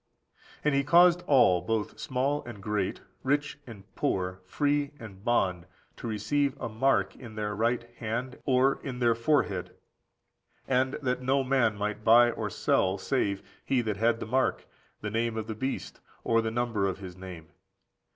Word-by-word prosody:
And 150 - +2
he 140 0 +2
caused 175 +4 +6
all, 120 -11 +5
both 110 -2 -2
small 135 +3 -1
and 120 -4 -8
great, 100 -1 -2 0.2
rich 145 +2 0
and 105 -5 -10
poor, 90 0 -1
free 145 +7 0
and 100 -4 -11
bond, 90 -7 +1 0.3
to - - -6
receive 135 +6 0
a - - -3
mark 125 +5 +1
in 120 -4 -11
their 105 -1 -2
right 120 +3 +1
hand 125 +3 -4
or 130 +1 +3
in 130 -2 -5
their 120 -2 +3
forehead; 115 - 0 0.9
and 130 +1 +2
that 125 -1 0
no 135 +2 +2
man 125 -5 +2
might 105 +1 -3
buy 120 +2 +6
or - - -3
sell, 95 +1 +1
save 100 -4 -1 0.2
he 130 -2 +1
that 110 -4 -2
had 115 +2 +2
the - - -4
mark, 130 +4 0 0.4
the 105 - -4
name 115 +1 -1
of 110 - -2
the 110 - -4
beast, 130 +5 -4 0.2
or 115 0 +3
the 110 - -1
number 115 -4 0
of 95 - -2
his 95 -2 -9
name. 90 -4 -10
115 Hz, 170 wpm, -28 LUFS, 105-130 Hz, 0.9 s, caused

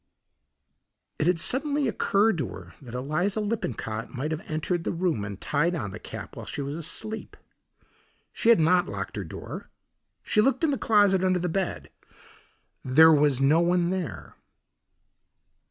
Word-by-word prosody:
It 155 - +1
had 175 -2 +2
suddenly 280 - +1
occurred 205 -3 +2
to - - -1
her 90 -2 -10
that 125 -3 -9
Eliza 155 +11 -1
Lippincott 125 - -3
might 145 +5 -4
have 155 0 -3
entered 165 +2 -1
the - - -1
room 170 - -1
and 100 -1 -6
tied 165 +4 0
on 110 - -4
the - - -8
cap - - -9
while - - -8
she 145 - -4
was 140 +2 -4
asleep. 215 +7 -4 1.0
She 230 - +1
had 235 - +7
not 180 +3 +3
locked - - -5
her - - -3
door. - - -8 0.5
She 210 - +2
looked 265 +5 +1
in 315 - +3
the 275 - 0
closet, 205 -4 +4
under 185 -1 +2
the 180 0 -1
bed; 190 +2 -3 0.9
there 160 +5 +7
was 145 -3 +3
no 140 +4 +4
one 175 0 +2
there. 160 - -5
170 Hz, 160 wpm, -26 LUFS, 145-200 Hz, 1.0 s, had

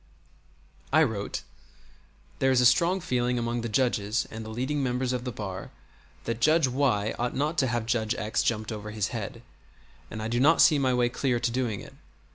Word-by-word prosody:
I 155 +3 +5
wrote: 110 -7 -3 1.0
"There 135 - +3
is 130 -1 +4
a 125 - +4
strong 170 +9 +4
feeling 125 -3 0
among 120 0 -1
the 115 - -4
judges 110 -2 0
and 110 0 -6
the 110 - -8
leading 130 +6 -2
members 125 -1 -1
of 125 0 -3
the 125 - -2
bar 95 -4 -6 0.5
that 115 0 -3
Judge 155 +1 +4
Y 125 -5 +1
ought 120 +1 -1
not 150 +4 0
to 130 - +2
have 120 -2 -1
Judge 115 -1 0
X 105 0 -1
jumped 110 -1 -1
over 105 -1 -6
his 105 0 -2
head, 115 +1 -6 0.7
and 110 - -6
I - - -2
do 120 +1 0
not 155 +5 +5
see 150 -3 +6
my 130 -2 +2
way 125 -1 +2
clear 125 -1 0
to 120 0 0
doing 120 -5 -2
it. - - -12
120 Hz, 200 wpm, -27 LUFS, 110-130 Hz, 1.0 s, see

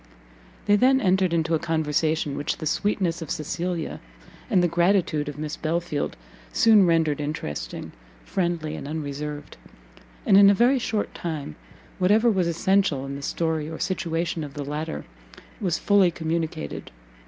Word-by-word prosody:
They 205 - +5
then 265 +3 +4
entered 185 -4 +2
into 165 0 0
a 160 - +2
conversation 155 -2 0
which 145 - -2
the 160 - -6
sweetness 180 0 0
of 160 - -6
Cecilia, 170 +1 -3 0.5
and 180 - +3
the - - +4
gratitude 170 -3 +1
of 145 - -8
Miss 150 0 -4
Belfield, 165 - -2 0.3
soon 210 - +5
rendered 160 -3 +2
interesting, 145 - -5 0.3
friendly 170 -4 -2
and - - -7
unreserved: 150 -1 -5 0.7
and 195 - +6
in 200 0 +8
a 200 - +5
very 250 +6 +4
short 220 -3 -2
time, 155 - -5 0.4
whatever 215 +6 +4
was 185 -4 +1
essential 170 -4 +1
in 140 0 -5
the 140 - -7
story 160 +1 -1
or 160 - -6
situation 170 -3 -2
of 145 -1 -8
the 145 -1 -4
latter 150 +3 -4 0.5
was 180 -7 0
fully 200 -3 +4
communicated. 160 - -3
165 Hz, 150 wpm, -25 LUFS, 150-185 Hz, 0.7 s, in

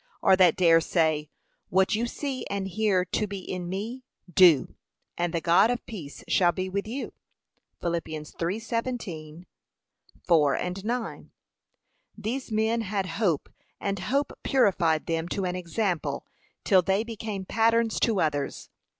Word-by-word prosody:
or 190 - +6
that 180 -3 +5
dare 165 -2 +5
say, 155 -3 +1 0.4
What 190 +3 +3
you 230 +3 0
see 270 +1 -4
and 200 -1 -2
hear 195 -2 +1
to 210 +4 -1
be 200 0 -5
in 180 -1 -5
me, 220 +7 -4 0.3
do, 165 -9 +6 0.4
'and 175 -1 -1
the 170 -1 -1
God 175 +6 +5
of 245 0 -2
peace 170 -11 -8
shall 175 -2 +4
be 185 +1 -3
with 200 +2 -2
you 255 +5 -5 0.3
?' - - -49
(Phil 170 - 0
3:17; 170 +1 -4 0.8
4:9) 180 - 0 0.9
These 230 +4 -4
men 220 +2 +1
had 200 -2 -2
hope 185 -4 0 0.3
and 200 -1 -2
hope 275 +9 0
purified 180 - +2
them 165 0 -1
to 195 0 -2
an 180 0 -2
example, 180 0 -2 0.4
till 190 -4 +5
they 195 +4 +1
became 220 -4 -5
patterns 230 +2 +2
to 220 -5 +2
others. 145 -3 -2
190 Hz, 140 wpm, -27 LUFS, 170-220 Hz, 0.9 s, or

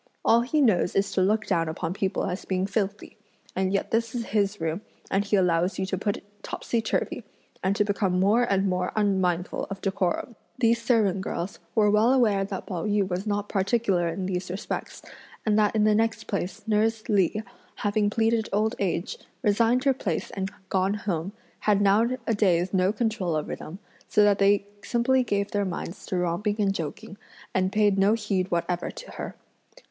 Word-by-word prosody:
All 230 +1 +5
he 280 +5 +1
knows 215 -9 +3
is 195 +1 +1
to 190 - +1
look 215 +3 +2
down 165 -4 +1
upon 165 +2 -3
people 190 -1 -1
as 185 -1 -3
being 185 0 -1
filthy; 205 +1 -3 0.4
and 190 0 0
yet 200 - -1
this 230 +1 0
is 235 -1 -2
his 205 -2 0
room 165 +3 -2 0.3
and 195 +1 +2
he 205 0 +1
allows 180 -1 +2
you 190 - -1
to 190 - -2
put 200 +2 -1
it - - -14 0.2
topsy 235 - -2
turvey, 220 - -2 0.4
and 190 +1 +2
to 210 - +2
become 195 -3 0
more 205 +6 +4
and 200 -5 +2
more 180 -1 0
unmindful 190 -4 0
of 195 -1 -5
decorum!" 195 +4 -1 0.2
These 230 -1 +3
servant 220 -5 +2
girls 185 0 -4 0.2
were 210 -2 +4
well 215 +4 +4
aware 220 -7 +3
that 195 -1 -5
Pao 180 -4 -4
yü 205 -2 +2
was 185 +3 -3
not 205 0 -1
particular 195 -3 +1
in 185 +3 -3
these 185 -1 -3
respects, 190 +4 -5 0.4
and 215 -2 +3
that 210 0 +2
in 215 - +3
the 215 0 +4
next 225 +1 +1
place 195 0 -4
nurse 220 +1 +1
Li, 205 -1 +2 0.4
having 205 0 +1
pleaded 225 +1 +1
old 215 +3 +1
age, 180 -2 -2 0.2
resigned 230 +3 +3
her 275 - +4
place 185 -10 -3
and 190 -1 -3 0.2
gone 190 +1 +1
home, 190 -4 -3 0.3
had 205 -2 +2
nowadays 205 -4 +2
no 185 0 +3
control 215 -7 -1
over 155 - -2
them, 165 +4 -9 0.3
so 210 - +4
that 205 -1 +4
they 200 0 +4 0.2
simply 250 +4 +2
gave 200 -3 -1
their 205 0 +1
minds 180 -1 -5
to 185 - -1
romping 180 +4 0
and 200 -2 +2
joking, 195 +5 -6 0.4
and 185 0 +1
paid 205 -2 +3
no 200 +2 +4
heed 200 -4 -1
whatever 175 +1 -1
to - - -10
her. - - -6
200 Hz, 185 wpm, -26 LUFS, 185-215 Hz, 0.4 s, All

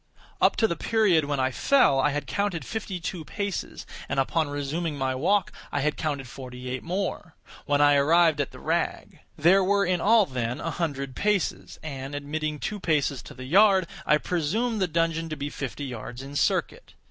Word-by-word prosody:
Up - - +4
to 225 - +2
the 170 - -2
period 200 -9 +2
when 145 -1 -2
I 130 0 +1
fell 250 - +3
I 145 - +3
had 145 0 -3
counted 200 -5 -2
fifty 210 -4 -4
two 170 0 -5
paces, 200 +3 -4 0.2
and - - 0
upon 155 +3 +1
resuming 145 +2 -3
my 130 -1 0
walk, 175 +9 +1 0.2
I 145 - -1
had 150 +2 0
counted 140 -4 -3
forty 125 0 -8
eight 130 - -3
more—when 170 -5 -3
I 145 0 +6
arrived 160 +1 +4
at 140 - -2
the - - -13
rag. - - -2 0.2
There 190 +5 +5
were 200 +1 +2
in 180 -1 0
all, 220 +2 +5
then, 125 -2 -3
a 165 - -3
hundred 140 -5 -3
paces; 210 -4 -1
and, 140 -2 -6
admitting 150 +1 -3
two 210 +7 -4
paces 150 -6 0
to - - -12
the 130 - -8
yard, 190 +4 +5 0.2
I 150 - +4
presumed 200 +9 -1
the 185 - +2
dungeon 165 0 0
to 155 - -3
be 145 +1 -4
fifty 140 +1 -5
yards 125 0 -7
in 140 +1 -9
circuit. - - -1
155 Hz, 190 wpm, -26 LUFS, 140-185 Hz, 0.2 s, I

